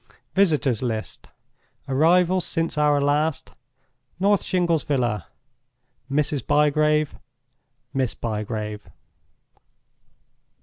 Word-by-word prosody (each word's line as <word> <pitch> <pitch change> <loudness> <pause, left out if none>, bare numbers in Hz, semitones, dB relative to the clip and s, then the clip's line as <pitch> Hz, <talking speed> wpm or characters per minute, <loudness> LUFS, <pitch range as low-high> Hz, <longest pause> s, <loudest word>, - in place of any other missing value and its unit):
"VISITORS' 150 - +2
LIST.—Arrivals 160 +8 -1
since 165 -1 -1
our 150 -1 +3
last. 145 +2 0 0.7
North 200 +1 +3
Shingles 170 -4 0
Villa—Mrs. 125 - -4
Bygrave; 150 0 +2 0.7
Miss 130 -3 -1
Bygrave." 105 -1 -4
145 Hz, 60 wpm, -23 LUFS, 125-155 Hz, 0.7 s, our